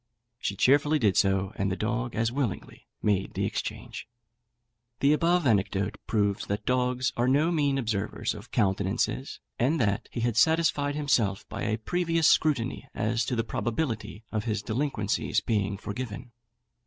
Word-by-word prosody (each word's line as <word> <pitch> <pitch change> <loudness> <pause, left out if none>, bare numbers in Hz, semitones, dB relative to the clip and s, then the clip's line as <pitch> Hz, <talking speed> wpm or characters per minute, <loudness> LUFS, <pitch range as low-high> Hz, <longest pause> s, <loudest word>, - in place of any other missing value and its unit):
She 100 - -2
cheerfully 145 +7 +4
did 105 -9 +2
so, 95 0 +2
and 100 -2 0
the - - 0
dog 120 +4 -2
as 115 +1 +1
willingly 125 -8 -4 0.2
made 100 -2 0
the - - 0
exchange." - - -5 0.9
The 140 +2 +4
above 170 +2 +2
anecdote 100 -3 +1
proves 105 -1 0
that 100 +1 -3
dogs 125 0 +1
are 120 +1 +1
no 145 +6 +3
mean 145 -4 +1
observers 110 -5 -2
of 105 +3 -11
countenances, 100 +4 0 0.2
and 140 +7 +2
that 105 -1 0
he 120 - -4
had 115 -1 0
satisfied 150 -1 +3
himself 120 -10 +1
by - - -5
a 110 0 0
previous 165 +5 +1
scrutiny 135 -3 +2
as 115 +2 0
to 125 - -1
the 115 - 0
probability 115 0 -3
of 110 -1 -2
his 105 -3 -1
delinquencies 110 -3 0
being 100 -3 -1
forgiven. 115 +3 -6
115 Hz, 155 wpm, -28 LUFS, 105-140 Hz, 0.9 s, cheerfully